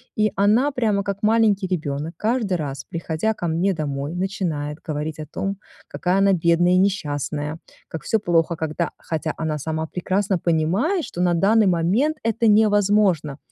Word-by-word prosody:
И 215 0 +2
она, 220 +9 +3
прямо 215 -6 0
как 200 0 -4
маленький 215 -3 +3
ребёнок, 155 -2 -3
каждый 215 -5 0
раз, 140 -3 -5
приходя 165 +4 -2
ко 175 - -3
мне 175 +4 +1
домой, 145 0 -4
начинает 170 -6 -3
говорить 155 0 -3
о 155 - -5
том, 195 0 -3 0.3
какая 180 +2 -1
она 195 0 +4
бедная, 175 +1 +3
несчастная, 155 -5 -1 0.3
как 160 - -6
всё 220 - +1
плохо, 170 -4 +1
когда 160 +1 -2
хотя 160 -1 -3
она 155 -2 -2
сама 160 +2 -3
прекрасно 190 +3 -1
понимает, 180 - +1
что 175 - -5
на 175 -1 +3
данный 205 +4 +4
момент 195 - +1
это 230 +1 +1
невозможно. 205 -8 +3
180 Hz, 155 wpm, -22 LUFS, 160-205 Hz, 0.3 s, она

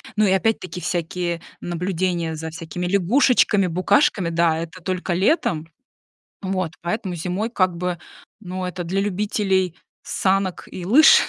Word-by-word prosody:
Ну 215 0 +4
и 190 - +3
опять-таки 190 -2 0
всякие 175 -1 -2 0.2
наблюдения 175 -1 -1
за 160 +1 -5
всякими 165 +2 -5
лягушечками, 200 0 +3
букашками. 185 - +2
Да, 165 -1 +2
это 170 +2 -7
только 185 +1 -2
летом. 175 - +1 0.7
Вот, 185 -4 -2
поэтому 180 +1 -2
зимой 185 +7 -2
как 185 -6 +1
бы, 180 0 -2 0.4
ну, 185 -2 -5
это 180 0 -4
для 190 +4 -1
любителей 195 -3 0 0.3
санок 190 -1 0
и 180 -2 -6
лыж. 295 +11 +7
180 Hz, 135 wpm, -22 LUFS, 170-195 Hz, 0.7 s, лыж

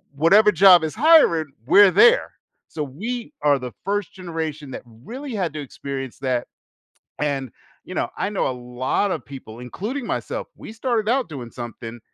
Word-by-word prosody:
whatever 200 +9 +5
job 180 -2 +7
is 155 - -3
hiring, 220 - +4
we're 200 -2 +7
there. 475 +3 +5 0.4
So 155 -2 -4
we 230 - -6
are 145 -2 +3
the 125 -1 -6
first 205 -2 -2
generation 160 -6 -5
that - - -7
really 230 - -9
had 180 -6 -2
to 150 - -5
experience 135 -1 -7
that, 130 -2 -1 0.7
and, 140 -4 -2 0.3
you - - -9
know, - - -1
I 200 - -1
know 205 - -1
a - - -1
lot 125 +9 -2
of - - -4
people, 130 -5 -10
including 215 - -5
myself, - - -4
we - - -10
started 225 -2 -1
out 255 -5 +1
doing 125 -6 -7
something, 120 -1 -8
160 Hz, 170 wpm, -22 LUFS, 130-210 Hz, 0.7 s, job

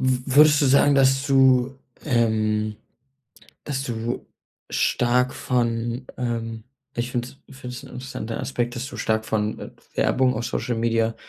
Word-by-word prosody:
w 130 +1 0
würdest 150 0 +7
du - - +4
sagen, 140 +1 +5
dass 135 0 +3
du, 130 -1 +4 0.3
ähm 110 -4 +1 0.9
dass 135 -2 -2
du 120 -1 -4 0.5
stark 125 +1 +2
von, 120 0 -1
ähm, 115 -2 -3 0.3
ich 120 +1 -2
finde 120 0 -2 0.2
es 140 - -14
finde 125 -2 -7
es - - -9
'n - - -10
interessanter 125 -3 -6
Aspekt, 120 -2 -2
dass 125 +3 -4
du - - -9
stark 110 0 0
von, 105 -1 -1
äh, - - -7 0.3
Werbung 130 -1 +2
auf 115 +2 -3
Social-Media, 115 -1 0
125 Hz, 150 wpm, -23 LUFS, 115-130 Hz, 0.9 s, würdest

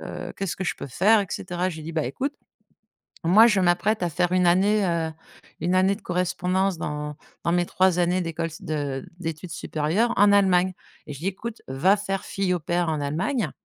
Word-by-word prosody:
heu, - - -7
qu'est-ce 195 -3 -3
que 190 - -4
je - - -1
peux - - -7
faire?» 205 - +4
et 200 - -3
cetera. 180 0 -2
Je 170 - -6
lui 155 - -8
dis: 165 - -6
«Bah 155 -1 0
écoute, 265 - -3 0.9
moi 200 +7 +7
je 210 -4 +3
m'apprête 180 +4 +2
à 175 - 0
faire 175 +2 0
une 185 -1 +3
année, 200 +4 +3
heu, 165 -2 0 0.5
une 180 +2 0
année 190 +2 +3
de 215 - -15
correspondance 180 +1 0
dans 150 -1 -4 0.3
dans 170 - +1
mes 175 0 +2
3 185 -1 +2
années 175 +1 +2
d'école 165 -1 -3
s 165 0 -11
de 145 -3 -3
d'études 165 0 -5
supérieures, 160 +9 0
en 205 +1 +6
Allemagne» 185 -2 +4 0.3
et 150 - -7
je 135 - -9
dis: 175 - -3
«Écoute, 220 +4 -5
va 145 +10 +3
faire 195 -1 -3
fille 195 -2 -1
au 180 - -1
pair 175 +2 -1
en 155 -1 -1
Allemagne 190 - -1
180 Hz, 210 wpm, -24 LUFS, 165-195 Hz, 0.9 s, moi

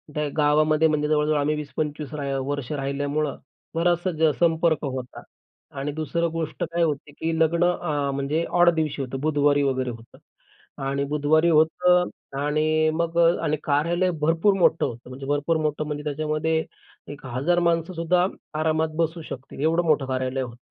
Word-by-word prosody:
त्या 150 0 0
गावामध्ये 155 +1 +3
म्हणजे 150 -1 0
जवळ-जवळ 150 0 +2
आम्ही 145 +1 +1
20-25 150 0 -4
राहि 140 -2 -3
वर्ष 145 -2 -3
राहिल्यामुळं 145 +1 -2 0.4
बराचसा 170 -2 +2
संपर्क 165 -1 +2
होता. 130 -2 -6 0.6
आणि 145 +2 -2
दुसरं 165 +2 -1
गोष्ट 160 -2 -3
काय 170 - +2
होते, 150 -2 -2
की 160 +3 -3
लग्न 165 +2 +3
अं, 150 -5 0
म्हणजे 150 +4 -1
ऑड 175 - +7
दिवशी 155 -3 -1
होतं 135 0 -4
बुधवारी 145 -1 +2
वगैरे 130 -2 0
होतं 115 0 -11 0.7
आणि 140 +1 -1
बुधवारी 150 +3 +2
होतं 180 +3 +3 0.3
आणि 155 +2 +2
मग 170 +1 -1 0.3
आणि 150 0 +1
कार्यालय 170 +5 +1
भरपूर 165 +6 +3
मोठं 165 - +3
होतं. 120 +1 -7
म्हणजे 135 +2 -8
भरपूर 145 +3 +1
मोठं 155 0 -1
म्हणजे 150 -1 -4
त्याच्यामध्ये 155 +2 -1 0.5
1,000 145 +5 -1
माणसंसुद्धा 170 +1 +1 0.3
आरामात 160 0 +1
बसू 165 0 -1
शकतील, 135 +1 -8
एवढं 165 +3 +2
मोठं 150 -4 +2
कार्यालय 130 0 -2
होतं. 120 -2 -6
155 Hz, 150 wpm, -24 LUFS, 145-165 Hz, 0.7 s, ऑड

